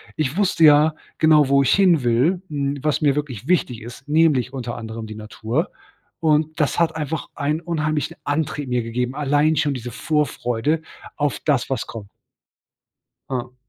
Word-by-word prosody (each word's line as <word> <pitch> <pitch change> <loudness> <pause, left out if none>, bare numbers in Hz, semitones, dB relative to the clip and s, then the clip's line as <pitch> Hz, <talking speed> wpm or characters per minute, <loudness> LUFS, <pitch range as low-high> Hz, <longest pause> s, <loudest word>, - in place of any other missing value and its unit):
ich 155 0 -1
wusste 190 -5 +2
ja 150 +1 +6 0.2
genau, 155 -3 +5
wo 140 0 +5
ich 135 - +2
hin 180 -8 +4
will, 130 +10 +2
hm, 140 -1 -2
was 150 +1 0
mir 145 -3 +3
wirklich 135 -4 -4
wichtig 130 -10 +1
ist, 120 +4 -11
nämlich 150 -5 +3
unter 120 -3 -4
anderem 110 -1 -6
die 110 - -8
Natur. 110 - -3 0.5
Und 155 -1 +1
das 150 +1 +1
hat 165 -1 +2
einfach 155 0 -3
einen 150 +2 -1
unheimlichen 155 -4 -2
Antrieb 145 -1 -2
mir 125 -1 +1
gegeben, 125 +2 -2
allein 145 +2 +2
schon 145 -1 +1
diese 125 -1 -6
Vorfreude 150 0 -1 0.4
auf 145 -2 0
das, 140 -5 +1
was 135 - -2
kommt. 110 -3 -9 1.2
Hm. 125 -1 -4
145 Hz, 160 wpm, -21 LUFS, 125-155 Hz, 1.2 s, ja